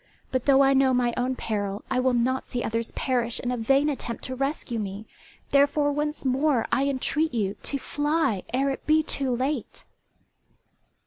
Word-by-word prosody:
But 255 -1 -1
though 275 -1 +6
I 270 0 +4
know 265 -1 +4
my 245 -1 +1
own 255 +1 -1
peril 205 -3 -3
I 255 - +2
will 255 -1 +2
not 255 +2 0
see 245 - -3
others 230 +1 -2
perish 240 -3 -1
in 245 - -2
a - - 0
vain 270 +5 +2
attempt 255 -5 -4
to 260 - -4
rescue 275 -3 -2
me, 200 +1 -5 0.5
therefore 285 +1 +3
once 295 0 -3
more 265 -1 +2
I 275 +1 +2
entreat 280 +2 0
you 200 -3 0
to 280 - -1
fly 290 - 0
ere 270 +3 +1
it 270 - -7
be 310 +1 +4
too 275 -3 -2
late!" 260 0 -3
260 Hz, 180 wpm, -26 LUFS, 240-280 Hz, 0.5 s, though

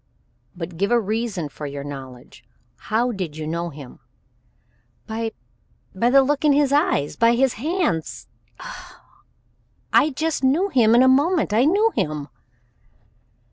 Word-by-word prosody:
"But 170 -1 -7
give 200 +3 0
a 240 - +3
reason 215 -5 -3
for 145 +1 -8
your 140 0 -6
knowledge. 130 -3 -10 0.3
How 235 +3 -1
did 180 -8 -5
you 155 - -5
know 170 +2 -3
him?" 140 -4 -12 1.1
"By 225 0 -4 0.6
by 230 +6 +1
the 270 +1 +6
look 285 +1 -1
in 295 -2 +4
his 285 -1 +2
eyes 145 - +1
by 230 +1 +3
his 260 +1 +2
hands 300 - -2 0.3
Oh! - - -10 1.0
I 305 - +5
just 310 0 -2
knew 315 +10 +2
him 235 - +4
in 245 - +6
a - - +5
moment. 285 - +2
I 235 +5 +4
knew 415 +8 +3
him." 150 -1 -2
230 Hz, 145 wpm, -22 LUFS, -, 1.1 s, the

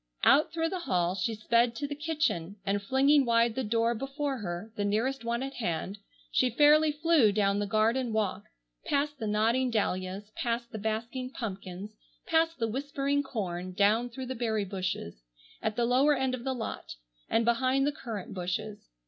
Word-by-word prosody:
Out 300 - +5
through 325 0 0
the 370 +1 -3
hall 180 - 0
she 200 +4 -1
sped 235 +2 +2
to 285 - -3
the 290 - -4
kitchen, 290 - -1
and 200 +1 0
flinging 270 +7 +4
wide 235 -1 +3
the 260 - -2
door 230 +1 +1
before 275 +2 -3
her, 180 +2 -5
the 205 - -1
nearest 230 +6 0
one 235 +2 -1
at 270 0 -5
hand, 190 -2 -3 0.3
she 255 - +3
fairly 300 +5 +5
flew 300 -7 +4
down 200 -1 +1
the 205 - -1
garden 225 +4 +1
walk, 215 -3 -1 0.4
past 290 0 -1
the 220 - -3
nodding 225 +5 +2
dahlias, 200 -2 -2
past 235 0 -2
the 220 - -5
basking 230 +4 -3
pumpkins, 195 -4 -6 0.3
past 325 0 +2
the 225 - 0
whispering 280 +3 -1
corn, 185 -9 -4
down 215 +5 +3
through 260 +2 -6
the 260 - -4
berry 220 -4 -1
bushes, 185 - -4 0.4
at 215 - -1
the 240 0 +1
lower 265 +5 +4
end 265 -1 0
of 250 -2 -4
the 265 0 -1
lot, 225 - -5 0.3
and 225 0 +2
behind 255 +3 +2
the 290 - +2
currant 230 - -6
bushes. 200 +3 -3
235 Hz, 180 wpm, -29 LUFS, 205-270 Hz, 0.4 s, Out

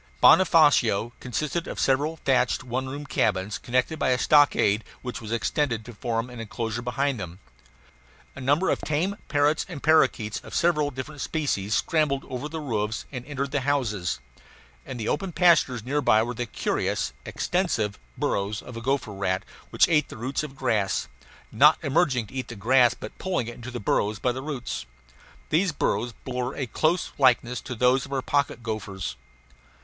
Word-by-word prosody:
Bonofacio 145 - +5
consisted 150 +7 -2
of - - -5
several 145 +4 +2
thatched 135 -2 +2
one 130 +1 -3
room 145 +2 -6
cabins, 105 -6 0
connected 125 +6 0
by - - +1
a 125 - +3
stockade 130 -7 +4 0.2
which 125 -2 -5
was 110 -1 -7
extended 115 0 0
to 120 - -9
form 115 +2 -2
an 125 -1 -10
enclosure 115 +1 -4
behind 125 +1 -1
them. 90 -2 -7 1.0
A - - -8
number 145 +8 +2
of - - -1
tame 170 +7 0
parrots 145 +2 +2
and 160 -6 -7
parakeets, 130 -9 +3
of - - -10
several 150 -4 +2
different 135 +2 -7
species, 110 -12 -1
scrambled 150 -5 +1
over 130 +4 -5
the 160 +1 -5
roofs 110 -6 -2
and 125 -3 -5
entered 140 -1 -3
the 145 - 0
houses. 115 - -1 0.7
In 130 - -5
the 110 -2 -4
open 180 +5 -1
pastures 155 -10 +4
near 140 +5 0
by 110 -4 +4
were 120 +1 -3
the 120 +1 -4
curious, - - -1
extensive 120 - -1 0.2
burrows 100 +2 -1
of 125 - -10
a 115 - -6
gopher 130 -3 -1
rat, 95 -1 -1 0.3
which - - +4
ate 155 -3 +2
the - - -9
roots 130 +5 -2
of 150 -3 -7
grass, 105 -7 0 0.4
not - - +6
emerging 135 -4 +2
to 100 - -16
eat 130 -1 -3
the 120 - -8
grass 120 +3 +4
but 110 - -9
pulling 185 -10 -1
it 120 - -5
into 120 +1 -9
the 120 -1 -5
burrows 105 0 0
by 125 - 0
the 130 +2 -5
roots. 135 - -5 0.6
These 175 +4 +3
burrows 120 -5 -1
bore 125 0 -3
a 135 - -2
close 160 +8 0
likeness 125 -2 +3
to 125 - -6
those 125 +3 +2
of - - -15
our 135 -2 -1
pocket 140 -3 0
gophers. 100 - -4
125 Hz, 175 wpm, -26 LUFS, 115-145 Hz, 1.0 s, not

